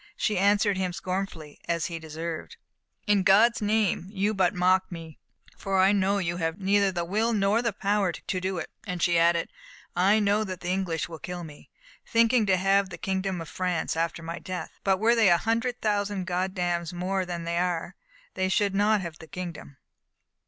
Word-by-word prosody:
She 210 -4 0
answered 205 0 +3
him 185 -1 -1
scornfully, 180 -5 -5
as 170 -1 0
he 170 -2 -4
deserved: 160 - -6 0.5
"In 205 -2 +3
God's 215 +6 +5
name, 210 -4 +1
you 205 +1 0
but 190 -1 +1
mock 185 +1 +2
me, 165 -3 -9 0.4
for 195 -1 -2
I 190 +1 +5
know 200 0 +2
you 175 -3 -2
have 165 -1 -2
neither 200 0 +3
the 175 -2 -2
will 220 +6 0
nor 205 +2 +2
the 230 -2 0
power 200 -2 0
to 185 +2 -4
do 190 0 -2
it;" 170 - -5 0.2
and 180 -2 -3
she 170 0 +3
added, 170 0 +3 0.5
"I 195 +5 +4
know 205 +1 +2
that 185 -4 -6
the 175 - -4
English 180 -4 -1
will 165 -2 -9
kill 180 -1 -6
me, 150 -3 -12 0.3
thinking 230 -1 +3
to 190 -1 +4
have 195 +1 +2
the 175 - -8
kingdom 190 -2 -2
of 165 - -7
France 180 -3 -1
after 165 0 -2
my 165 +1 -5
death; 185 -2 -6
but 195 -1 +3
were 225 +4 +3
they 225 -4 +5
a 175 - +6
hundred 230 +4 -1
thousand 205 -3 0
Goddams 180 -2 -1
more 185 +2 -1
than 175 -2 -5
they 170 +1 -1
are, 180 +1 -2 0.4
they 185 0 -1
should 200 +1 +1
not 205 +1 +3
have 170 -3 -7
the 160 - -11
kingdom." 160 -3 -7
185 Hz, 195 wpm, -27 LUFS, 170-200 Hz, 0.5 s, a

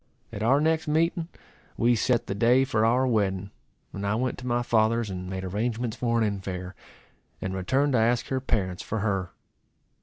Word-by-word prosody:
At 100 - -5
our 130 +6 +4
next 160 +1 +1
meeting 165 +2 +1 0.5
we 120 +1 +3
set 120 +1 +1
the - - -3
day 120 +5 +4
for 110 -4 +1
our 120 +4 +3
wedding; 100 -5 0 0.4
and 100 - -5
I 100 +1 0
went 125 +2 -1
to 125 - -7
my 120 0 +1
father's, 115 -1 +2
and 90 0 -5
made 95 0 -4
arrangements 110 +4 -2
for 115 -1 0
an 105 -3 0
infair, 90 -1 -5 0.7
and 95 - -4
returned 130 +10 +1
to 125 - +4
ask 120 +2 +1
her 130 - 0
parents 95 -8 -1
for 110 -1 -3
her. 95 -4 -1
115 Hz, 185 wpm, -26 LUFS, 100-125 Hz, 0.7 s, our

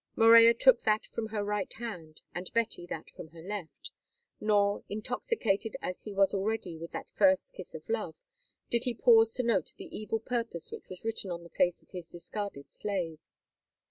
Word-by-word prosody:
Morella 230 0 +8
took - - +6
that 215 0 +2
from 225 -1 -4
her 215 -1 -2
right 205 -1 -2
hand, 175 -10 -7
and 175 +1 -4
Betty 225 -6 0
that 160 - -6
from - - -10
her 165 +1 -13
left, 195 -3 -6 0.5
nor, 205 -1 +2
intoxicated 215 - -1
as 180 - -4
he 210 - -5
was 195 -1 +3
already 200 -3 -1
with 165 +1 -7
that - - -6
first 285 - +3
kiss - - -10
of - - -9
love, 465 - -2 0.6
did 235 0 +1
he 245 -2 0
pause 225 -1 +6
to 255 - +1
note 215 -8 +1
the - - -9
evil 215 +1 -2
purpose 230 -7 -3
which - - -9
was 185 +3 -6
written 225 -3 0
on 170 -1 -5
the 170 - -12
face 175 -1 +1
of - - -30
his 180 -3 -7
discarded 175 -4 -6
slave. 180 -6 -3
210 Hz, 185 wpm, -30 LUFS, 180-225 Hz, 0.6 s, Morella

